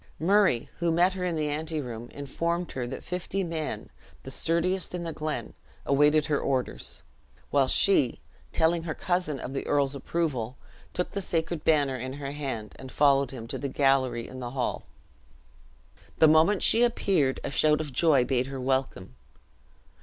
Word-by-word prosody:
Murray, 190 - +3
who 170 -1 +1
met 175 +3 +3
her 185 -1 -4
in 175 -2 -1
the 155 -1 -1
anteroom, 145 -7 -4
informed 170 +5 -3
her 125 -2 -4
that 130 - -7
fifty 180 +2 -3
men, 165 -3 -4 0.3
the 135 - -8
sturdiest 175 +5 -1
in 175 - -4
the 165 -1 -4
glen, 155 0 -4 0.3
awaited 150 +2 +4
her 150 -2 0
orders; 125 - -3 0.5
while 140 -2 +3
she, 140 -6 +3 0.3
telling 165 +1 +2
her 165 -2 -4
cousin 175 -6 -1
of 130 - -6
the 135 - -4
earl's 140 -1 +2
approval, 135 -4 -2 0.3
took 180 - -2
the 200 - -3
sacred 165 -2 -2
banner 145 -4 +2
in 130 +2 -5
her 140 0 -5
hand, 135 -7 -5
and 130 0 -10
followed 140 -2 +3
him 125 -4 -8
to - - -5
the 140 - -3
gallery 130 -4 +1
in 130 - -9
the 120 -1 -5
hall. 125 - -2 1.3
The 160 - +6
moment 160 +6 +4
she 230 - +7
appeared, 190 - +1
a - - -3
shout 150 +1 +3
of 150 -4 -5
joy 140 -3 +4
bade 125 -1 0
her 135 -1 -6
welcome. 130 - -2
145 Hz, 170 wpm, -27 LUFS, 130-170 Hz, 1.3 s, she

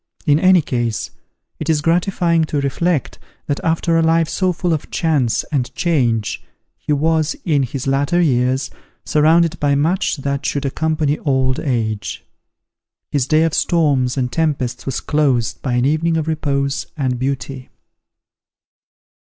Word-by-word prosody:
In 145 0 +4
any 185 -2 +5
case, 120 -5 -2 0.5
it - - -4
is 155 -2 +3
gratifying 170 +1 +1
to 150 -1 -2
reflect, 145 +2 -1 0.3
that 145 - -2
after 165 0 +1
a - - +3
life 165 0 +3
so 185 +2 0
full 175 0 -1
of 155 - -4
chance 145 -8 +1
and 130 -5 -1
change, 120 -11 0 0.3
he - - -6
was, 155 +1 +1
in 150 -5 +2
his 130 0 -3
latter 140 +6 +1
years, 130 -4 +1 0.3
surrounded 165 +2 +3
by 145 -1 +2
much 165 +5 +1
that 140 0 -3
should 145 0 -2
accompany 155 +1 0
old 130 -2 0
age. 115 -7 -2 0.9
His 140 -3 0
day 155 +2 +3
of 165 -1 0
storms 140 -8 +1
and 125 -2 -1
tempests 145 -8 -1
was 135 - -2
closed 135 -7 0
by 130 - -2
an 125 +1 +2
evening 160 +3 +1
of 160 -1 -2
repose 140 -3 -1
and 130 -4 -1
beauty. 135 0 -4
145 Hz, 145 wpm, -18 LUFS, 130-160 Hz, 0.9 s, any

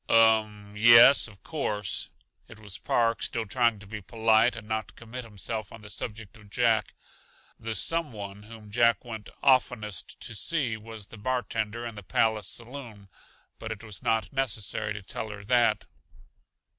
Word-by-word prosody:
"Um 110 -2 +4
m - - -16
yes, 115 +5 +8
of 100 -3 -17
course." 105 - -2 0.4
It 115 - -13
was 105 -3 -7
Park, 115 -1 +1
still 115 -1 -2
trying 115 +1 +2
to 105 - -11
be 105 +1 -7
polite 110 +3 +3
and 110 -2 -9
not 110 0 -3
commit 120 +2 -8
himself 110 0 -5
on 110 - -11
the 100 - -9
subject 105 -2 -6
of 105 -2 -17
Jack. 115 -1 +2 0.6
The 110 0 -4
"some 165 +7 0
one" 100 -2 -8
whom 105 -1 -12
Jack 115 +2 +3
went 110 -3 -7
oftenest 120 - +1
to - - -6
see 130 0 0
was 110 -1 -9
the 110 - -9
bartender 115 -1 -2
in 115 - -5
the 105 - -8
Palace 110 +2 +1
saloon, 115 -5 -7 0.5
but 110 - -5
it 110 0 -6
was 105 -4 -6
not 115 +3 0
necessary 110 -5 -2
to 100 -1 -7
tell 110 +3 -5
her 100 -1 -8
that. 115 -2 +3
110 Hz, 170 wpm, -28 LUFS, 105-115 Hz, 0.6 s, yes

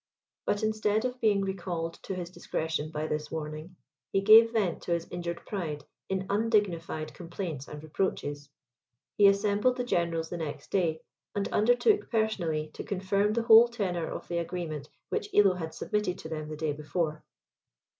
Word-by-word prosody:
But 205 - +1
instead 215 +1 +1
of 250 0 -3
being 205 -3 +3
recalled 175 -4 -3
to 190 - -3
his 175 -1 -5
discretion 160 -3 -3
by 155 0 -3
this 150 -1 -3
warning, 155 +2 -6 0.4
he 195 - +2
gave 220 +3 +8
vent 200 -7 0
to 175 - -1
his 170 0 -2
injured 170 -1 -4
pride 155 -8 -4 0.3
in 190 0 -1
undignified 200 -7 0
complaints 170 -5 -5
and 150 0 -8
reproaches. 145 -3 -2 0.7
He 205 - +7
assembled 205 +5 +3
the 250 - 0
generals 170 -7 0
the 175 - -3
next 155 -3 -6
day, 165 -5 +1 0.3
and 200 -1 0
undertook 245 - +3
personally 170 -9 0
to - - -6
confirm 200 +2 0
the 230 +1 0
whole 230 0 +9
tenor 190 -8 -2
of - - -6
the 170 -1 -1
agreement 165 -4 -4 0.2
which 205 - -2
Illo 200 -2 +6
had 165 -3 -5
submitted 210 -2 -1
to 160 - -8
them 155 -1 -4
the 155 - -6
day 155 -1 -1
before. 155 +1 -2
180 Hz, 165 wpm, -29 LUFS, 160-205 Hz, 0.7 s, whole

